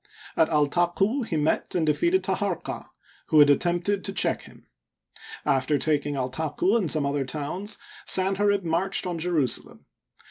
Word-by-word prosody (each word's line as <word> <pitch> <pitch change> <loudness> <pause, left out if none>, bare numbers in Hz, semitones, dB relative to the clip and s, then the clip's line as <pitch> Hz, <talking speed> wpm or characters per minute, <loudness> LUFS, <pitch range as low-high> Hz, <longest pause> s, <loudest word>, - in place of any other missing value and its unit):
At 160 - +3
Altaqu 175 - +1
he 165 - -2
met 150 +4 -1
and 170 -3 +1
defeated 345 - +1
Taharqa, - - -3 0.4
who 155 - +2
had 145 -1 +7
attempted 175 +6 0
to 195 - -3
check - - 0
him. - - -16 0.8
After 135 +2 +1
taking 145 -1 0
Altaqu 150 - -1
and 200 -9 0
some 150 -2 +1
other 140 0 -1
towns, 155 +9 -3 0.3
Sanherib 195 +1 +3
marched 175 +4 0
on 175 -2 -3
Jerusalem. 160 -8 -1
165 Hz, 140 wpm, -25 LUFS, 145-195 Hz, 0.8 s, had